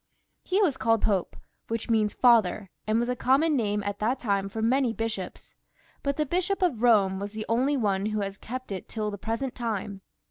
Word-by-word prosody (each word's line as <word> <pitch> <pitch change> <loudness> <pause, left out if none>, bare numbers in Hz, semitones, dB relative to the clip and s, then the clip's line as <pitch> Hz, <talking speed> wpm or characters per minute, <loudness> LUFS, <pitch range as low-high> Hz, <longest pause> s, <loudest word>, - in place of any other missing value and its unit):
He 390 +3 +1
was 295 -9 +1
called 225 0 +2
Pope, 195 -5 0 0.3
which 230 0 -3
means 220 -3 +1
father, 215 -6 +3 0.2
and 215 +1 +2
was 240 - 0
a 250 - -1
common 280 +6 +3
name 210 -4 0
at 205 0 -3
that 235 +5 +1
time 200 -5 -1
for 220 - -6
many 245 +2 +2
bishops; 225 -5 -5 0.5
but 280 -1 -1
the 305 - +1
Bishop 365 +5 0
of 305 -11 +1
Bome 205 -5 +4
was 200 +1 -5
the 215 0 -5
only 260 +5 +2
one 200 -4 0
who 215 -1 -1
has 195 0 -3
kept 255 0 -7
it 190 -2 -6
till 215 -2 -3
the 205 - -7
present 230 +5 -3
time. 210 -4 -4
225 Hz, 205 wpm, -27 LUFS, 205-255 Hz, 0.5 s, Bome